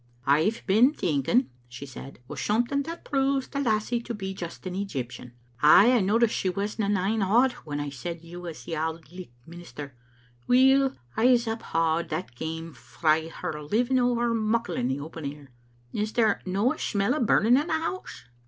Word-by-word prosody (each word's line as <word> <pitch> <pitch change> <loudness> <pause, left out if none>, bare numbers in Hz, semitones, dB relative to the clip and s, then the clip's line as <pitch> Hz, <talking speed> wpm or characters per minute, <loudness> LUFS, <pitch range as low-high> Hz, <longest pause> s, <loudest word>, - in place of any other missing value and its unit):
"I've 160 +11 +2
been 230 +9 +5
thinking," 160 - +1 0.2
she 125 +3 -8
said, 135 0 -10
"o' - - -7
something 240 +6 0
that 330 +4 -7
proves 270 -1 0
the 280 - -4
lassie 235 -1 0
to 235 0 -5
be 195 -2 -5
just 175 -1 -8
an 185 - -4
Egyptian. 130 -11 -5 0.3
Ay, 195 +10 +7
I 250 - +4
noticed 220 +4 +2
she 190 - 0
wasna 200 +2 -2
nane 205 +2 +1
awed 235 +7 +4
when 145 -1 -4
I 145 -1 -4
said 165 +5 -6
you 175 +1 -9
was 165 -8 -8
the 165 - -4
Auld 160 0 -4
Licht 180 -5 -10
minister. 165 -4 -9 0.5
Weel, 265 +2 +4 0.2
Pse 245 +1 +4
uphaud 165 -7 -1
that 120 - -4
came 160 +5 -6
frae 155 +6 0
her 155 -2 -5
living 240 - +1
ower 240 -1 +1
muckle 225 +1 0
in 120 - 0
the 130 +2 -1
open 160 +2 -8
air. 145 -2 -14 0.4
Is 215 +1 -2
there 225 -2 +2
no* 200 +7 +1
a - - -11
imell 200 +2 0
o* 305 - -1
burning 225 +2 +4
in 290 +5 +1
the - - -1
house?" 325 +4 -4
195 Hz, 180 wpm, -26 LUFS, 160-240 Hz, 0.5 s, Ay